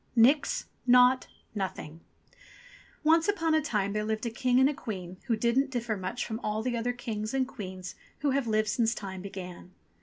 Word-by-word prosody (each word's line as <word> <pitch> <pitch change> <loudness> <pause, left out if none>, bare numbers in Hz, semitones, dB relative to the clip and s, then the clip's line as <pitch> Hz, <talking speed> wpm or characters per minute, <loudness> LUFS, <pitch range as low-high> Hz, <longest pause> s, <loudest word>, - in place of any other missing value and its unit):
NIX 260 +6 +4 0.2
NAUGHT 250 +1 +6 0.3
NOTHING 185 -6 -4 1.0
ONCE 325 +1 +4
upon 330 -6 +1
a 315 - +4
time 205 -8 -1
there 210 0 0
lived 220 +2 -2
a 235 - -1
King 250 +2 +2
and 265 - +6
a 295 - 0
Queen 185 -8 -6
who 235 - +2
didn't 235 +5 +2
differ 240 -4 -2
much 190 +5 -3
from 220 0 -4
all 215 -1 -2
the 250 0 -1
other 235 +1 0
kings 225 -1 -4
and 260 -1 +1
queens 185 -5 -7 0.3
who 285 -1 +2
have 270 -2 0
lived 215 -1 +2
since 230 0 +1
Time 190 -2 -6
began. 185 -2 -8
230 Hz, 185 wpm, -29 LUFS, 200-255 Hz, 1.0 s, NAUGHT